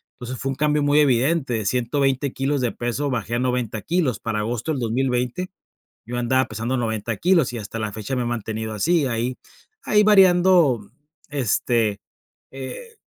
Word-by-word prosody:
entonces, 125 0 -7
fue 135 - -2
un 135 - -2
cambio 150 +1 +1
muy 145 +1 +3
evidente, 135 +1 +2
de 110 -3 -2
120 135 +2 0
kilos 135 +1 -1
de 120 -2 0
peso 130 +4 -2
bajé 115 -2 -2
a - - 0
90 125 -4 -1
kilos 160 - 0
para 110 -2 -2
agosto 120 +6 -2
del 145 - -2
2020, 125 +8 -1 0.5
yo 120 +2 -4
andaba 130 +2 +1
pesando 115 +4 -2
90 110 -2 -2
kilos 170 -7 +3
y 120 - -5
hasta 110 0 -6
la 110 -2 -3
fecha 110 +5 -4
me 125 - 0
he - - -2
mantenido 110 -2 -3
así, 155 - +2
ahí 120 0 -1 0.5
ahí 210 - +4
variando, 180 - +5 0.4
este, 115 -5 0 0.5
eh, 135 - -8
125 Hz, 170 wpm, -22 LUFS, 115-145 Hz, 0.5 s, variando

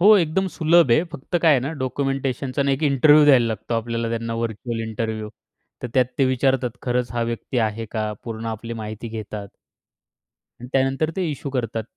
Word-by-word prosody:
हो, 210 +4 +8
एकदम 185 +1 +1
सुलभ 165 -3 +4
आहे. 155 +8 +4
फक्त 145 +6 -3
काय 165 - +6
आहे 135 - +3
ना, 135 +4 -3
डॉक्युमेंटेशनचा 135 0 -1
एक 135 +3 -1
इंटरव्ह्यू 150 +1 +6
द्यायला 130 -5 +6
लागतो 115 +1 -3
आपल्याला. 115 0 -2
त्यांना 115 0 -3
व्हर्चुअल 115 0 -3
इंटरव्ह्यू. 110 -1 -3 0.5
तर 125 - -3
त्यात 130 -1 +5
ते 135 - +4
विचारतात, 130 -1 +1
खरंच 125 -1 -1
हा 120 -1 0
व्यक्ती 115 +2 -3
आहे 110 +1 -6
का. 110 -2 -2
पूर्ण 115 -1 -5
आपली 115 +1 -5
माहिती 110 +2 -6
घेतात. 105 -2 -6 1.1
आणि 125 - -8
त्यानंतर 135 +4 +1
ते 185 -2 0
इश्यू 140 -1 -5
करतात. 115 -4 -2
125 Hz, 175 wpm, -22 LUFS, 115-140 Hz, 1.1 s, हो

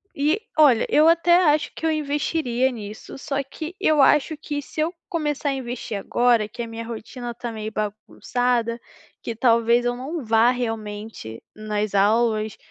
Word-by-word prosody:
e 305 +9 +1 0.2
olha, 275 -7 +5
eu 305 +2 +5
até 340 +1 +4 0.2
acho 305 - -1
que 325 - -5
eu 320 - +3
investiria 285 -4 0
nisso, 215 0 -9
só 275 0 -2
que 315 +6 -8
eu 305 -2 +3
acho 300 +3 +3
que 290 -1 -4
se 300 - -10
eu 335 +3 0 0.2
começar 295 -3 -1
a - - 0
investir 245 -4 -5
agora, 235 +1 +2
que 240 +3 -7
a 230 - -6
minha 225 0 -7
rotina 235 +2 -7
tá 240 -1 -5
meio 215 0 -5
bagunçada, 235 +3 -2 0.4
que 230 - -5
talvez 235 0 +3
eu 245 0 0
não 280 +3 -5
vá 225 +2 +4
realmente 215 - -5
nas 215 -1 -3
aulas. 215 +1 +2
240 Hz, 165 wpm, -23 LUFS, 225-290 Hz, 0.4 s, olha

